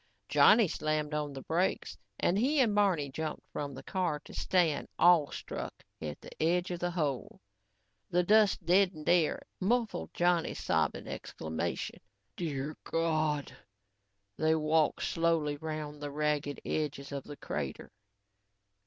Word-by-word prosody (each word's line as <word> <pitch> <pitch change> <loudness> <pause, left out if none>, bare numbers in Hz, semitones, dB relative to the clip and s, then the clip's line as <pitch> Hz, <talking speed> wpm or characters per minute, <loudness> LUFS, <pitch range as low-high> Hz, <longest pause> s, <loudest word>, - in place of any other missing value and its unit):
Johnny 215 -1 +6
slammed 155 -1 -1
on 150 -1 -1
the 135 -1 -8
brakes 175 +4 0 0.2
and 190 +3 +2
he 280 +6 +2
and 235 -5 +4
Barney 185 -9 +2
jumped 155 +2 -4
from 140 -2 -4
the - - -9
car 180 -6 -1
to - - -12
stand, 170 -6 +1
awe 170 -4 +6
struck, - - -6 0.2
at 75 -1 -5
the - - -11
edge 175 +3 +2
of 175 - -3
the 175 - 0
hole. 150 -7 -2 0.7
The 180 +1 +2
dust 210 -2 +4
deadened 180 -3 +3
air 175 - +3 0.2
muffled 215 - 0
Johnny's 175 -1 +2
sobbing - - 0
exclamation: 80 +2 -4 0.4
"Dear 150 -3 -3
God!" 155 -3 0 0.8
They 160 0 +3
walked 155 0 +2
slowly 165 -3 +1
around 155 -1 -5
the 145 0 -4
ragged 150 -1 -1
edges 145 -2 -2
of 140 -1 -4
the 145 - -9
crater. 70 -3 -5
155 Hz, 135 wpm, -31 LUFS, 145-180 Hz, 0.8 s, Johnny